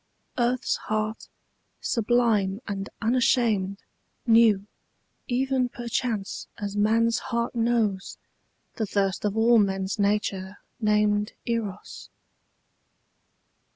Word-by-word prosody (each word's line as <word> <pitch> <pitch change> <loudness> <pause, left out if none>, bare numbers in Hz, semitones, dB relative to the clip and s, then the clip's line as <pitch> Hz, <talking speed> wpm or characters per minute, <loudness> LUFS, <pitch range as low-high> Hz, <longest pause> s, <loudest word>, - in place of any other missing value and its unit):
Earth's 245 +1 +1
heart, 215 0 -2 0.5
sublime 220 -4 +1
and 200 -1 -4
unashamed, 225 -5 +1 0.4
Knew, 225 -4 +5 0.6
even 260 0 +1
perchance 235 -4 -3
as 205 -1 -4
man's 225 +2 +2
heart 235 +1 -1
knows, 225 -5 0 0.6
The 220 - -1
thirst 195 0 0
of 205 +1 -1
all 230 +1 +5
men's 195 0 0
nature 200 -1 0 0.2
named 210 -1 +2
Eros. 220 -4 -4
215 Hz, 85 wpm, -26 LUFS, 200-235 Hz, 0.6 s, Knew